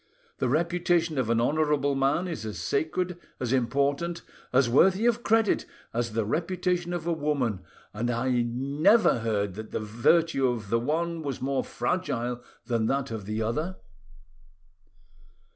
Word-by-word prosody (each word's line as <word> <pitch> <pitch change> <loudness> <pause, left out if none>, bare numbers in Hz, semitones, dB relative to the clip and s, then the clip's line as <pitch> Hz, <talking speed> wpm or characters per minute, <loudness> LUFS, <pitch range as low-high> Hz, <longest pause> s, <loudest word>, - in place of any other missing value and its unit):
The - - +1
reputation 170 0 +1
of 120 -4 0
an 115 0 +3
honourable 145 +2 +2
man 140 +6 +1
is 165 -11 -5
as 110 -1 -5
sacred, 175 +4 -1 0.2
as 125 0 -1
important, 140 +7 0 0.3
as 130 0 +4
worthy 190 - +4
of 240 -1 +2
credit 225 -2 +2 0.3
as 115 -1 -1
the 110 -1 0
reputation 175 - -1
of 175 -2 -3
a 170 - +1
woman, 145 - -1 0.3
and 115 +4 -2
I 120 +1 +1
never 140 - +3
heard 105 -4 -1
that 110 +3 -8
the - - -3
virtue 130 +7 +2
of 115 -5 -3
the 115 - +3
one 165 +6 -1
was 140 -4 -4
more 135 0 -1
fragile 125 -4 -2 0.2
than 115 -2 0
that 135 0 -1
of 105 -3 -5
the 110 +1 -1
other." 155 +12 -2
140 Hz, 150 wpm, -27 LUFS, 115-170 Hz, 0.3 s, as